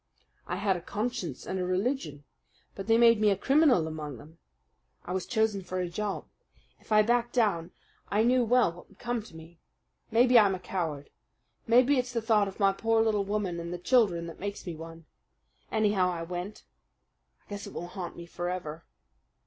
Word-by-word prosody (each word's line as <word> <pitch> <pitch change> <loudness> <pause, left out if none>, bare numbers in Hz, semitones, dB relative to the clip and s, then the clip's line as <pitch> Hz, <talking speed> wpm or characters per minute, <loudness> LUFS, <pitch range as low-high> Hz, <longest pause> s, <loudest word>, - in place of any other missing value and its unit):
"I 180 - -2
had 195 0 +1
a 175 - -5
conscience 200 - -4
and 190 - -3
a - - 0
religion; 185 - -2 0.5
but 195 - -7
they 225 0 +5
made 230 -2 +5
me 210 - +5
a 195 - +2
criminal 270 - +4
among 150 -4 -6
them. 155 +6 -15 0.7
I - - -6
was 185 - -3
chosen 220 -4 +1
for 185 0 -4
a 180 - -1
job. 205 +3 -3 0.5
If - - -22
I 215 0 +6
backed 240 +1 +1
down 200 -9 +1 0.4
I 210 +2 +2
knew 250 +1 +4
well 245 -5 +3
what 175 - -15
would - - -21
come 240 -1 -2
to 205 -6 -15
me. 165 +1 -13 0.5
Maybe 240 +2 +6
I'm 200 -3 +4
a - - -7
coward. 160 -7 -4 0.6
Maybe 255 +4 +5
it's 250 0 -3
the 235 - +1
thought 220 -3 +2
of 195 - -9
my 195 -1 +4
poor 225 +2 +2
little 210 -3 +1
woman 195 -4 -2
and 170 0 -5
the 175 - -3
children 180 -4 +2
that 165 - -9
makes 200 +1 -5
me 175 - -4
one. 165 0 -10 0.7
Anyhow 205 -4 +2
I 170 -2 -3
went. 180 +4 -6 0.8
I - - -33
guess 205 0 -6
it - - -10
will 175 - -5
haunt 180 -1 -7
me 170 - -8
forever. 175 -2 -5
195 Hz, 195 wpm, -29 LUFS, 170-225 Hz, 0.8 s, I